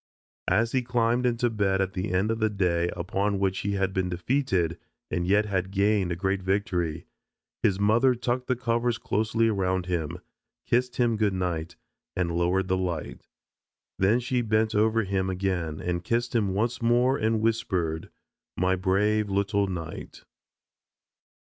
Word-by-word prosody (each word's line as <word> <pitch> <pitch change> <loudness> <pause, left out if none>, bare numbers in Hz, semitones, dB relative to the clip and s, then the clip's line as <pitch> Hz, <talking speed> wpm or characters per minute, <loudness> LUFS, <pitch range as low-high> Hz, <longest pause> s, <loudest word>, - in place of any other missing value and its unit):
As 110 +5 +2
he 130 - +1
climbed 120 0 +1
into 120 0 +1
bed 100 -3 +1
at 95 -1 0
the 95 +2 -3
end 95 +4 +1
of 115 - -2
the 110 -1 +2
day 90 -4 0
upon 100 +3 -1
which 95 -1 0
he 100 0 -2
had 95 -1 0
been 95 -1 0
defeated 90 - 0 0.3
and 85 0 -1
yet 105 +3 +3
had 95 -3 -1
gained 100 -1 +1
a - - 0
great 95 +2 -1
victory, 90 -4 -1 0.6
his 95 -1 +2
mother 115 +5 +4
tucked 125 +1 -2
the 130 - +1
covers 120 -1 0
closely 110 +2 0
around 95 -4 0
him, 85 -2 -2 0.5
kissed 125 +1 +1
him 120 -2 +2
good 105 -3 +1
night, 85 -3 -2 0.4
and 85 -2 -1
lowered 90 +2 +1
the 95 0 +1
light. 90 -4 -4 0.7
Then 100 +6 +4
she 125 0 0
bent 110 -1 +1
over 110 +2 +2
him 95 -1 -1
again 90 -4 -2
and 90 0 -2
kissed 120 +5 -1
him 100 -5 +1
once 115 +4 -1
more 120 +3 +3
and 110 -3 +1
whispered, 95 -8 -1 0.5
"My 90 +1 +2
brave 105 +3 +1
little 100 +1 +1
knight." 85 -4 -7
100 Hz, 160 wpm, -27 LUFS, 90-115 Hz, 0.7 s, mother